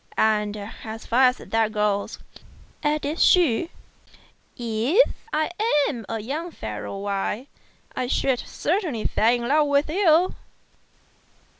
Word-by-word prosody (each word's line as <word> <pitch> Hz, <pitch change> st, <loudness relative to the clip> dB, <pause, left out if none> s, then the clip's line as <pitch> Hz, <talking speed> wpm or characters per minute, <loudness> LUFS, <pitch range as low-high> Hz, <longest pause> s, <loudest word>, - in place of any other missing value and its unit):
And, 210 Hz, -1 st, +1 dB, 0.3 s
as 220 Hz, 0 st, -7 dB
far 255 Hz, +3 st, +4 dB
as 250 Hz, 0 st, +3 dB
that 225 Hz, -1 st, 0 dB
goes," 210 Hz, -2 st, -1 dB, 0.6 s
added 300 Hz, +1 st, -1 dB
she, 340 Hz, -3 st, +4 dB, 0.9 s
"if 240 Hz, -, +2 dB, 0.2 s
I 310 Hz, +2 st, 0 dB, 0.4 s
were 235 Hz, -5 st, -7 dB
a 225 Hz, -, -2 dB
young 290 Hz, +10 st, -4 dB
fellow 110 Hz, -, -6 dB
why 200 Hz, +4 st, -2 dB, 0.5 s
I 255 Hz, -, -2 dB
should 260 Hz, 0 st, +1 dB
certainly 325 Hz, -, -2 dB
fall 225 Hz, +2 st, +3 dB
in 240 Hz, 0 st, -3 dB
love 295 Hz, +2 st, +3 dB
with 285 Hz, +2 st, +1 dB
you." 355 Hz, -1 st, +3 dB
250 Hz, 120 wpm, -24 LUFS, 220-310 Hz, 0.9 s, far